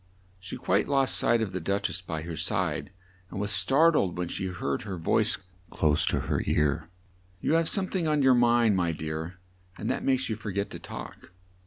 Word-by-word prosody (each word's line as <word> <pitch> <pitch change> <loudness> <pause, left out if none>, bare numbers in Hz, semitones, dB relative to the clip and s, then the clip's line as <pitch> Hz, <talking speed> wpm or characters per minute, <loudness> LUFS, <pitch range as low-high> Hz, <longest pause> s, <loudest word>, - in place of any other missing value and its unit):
She 90 0 -7
quite 100 +3 +1
lost 135 -2 +3
sight 120 -1 +3
of 100 - -4
the 95 - -3
Duch 100 +4 -1
ess 95 - -4
by 80 -4 -5
her 85 0 -5
side, 80 -3 -1 0.4
and 95 - -6
was 105 +1 -1
star 140 +9 +4
tled 95 - +1
when 90 -1 -2
she 95 - -3
heard 80 -7 -3
her 100 -3 -5
voice 80 - +2 0.3
close 75 -1 +1
to - - +1
her - - -1
ear. 75 +2 +1 0.5
"You 150 - 0
have 165 0 +3
some 195 -2 +2
thing 180 -4 -1
on 150 -2 +2
your 130 -1 +6
mind, 120 -3 +4
my 85 -3 +1
dear, 80 +3 -5 0.4
and - - -2
that - - -2
makes 130 -1 +1
you 110 - -2
for 105 0 -7
get 100 +1 -2
to - - -7
talk. - - -9
95 Hz, 210 wpm, -28 LUFS, 85-120 Hz, 0.5 s, your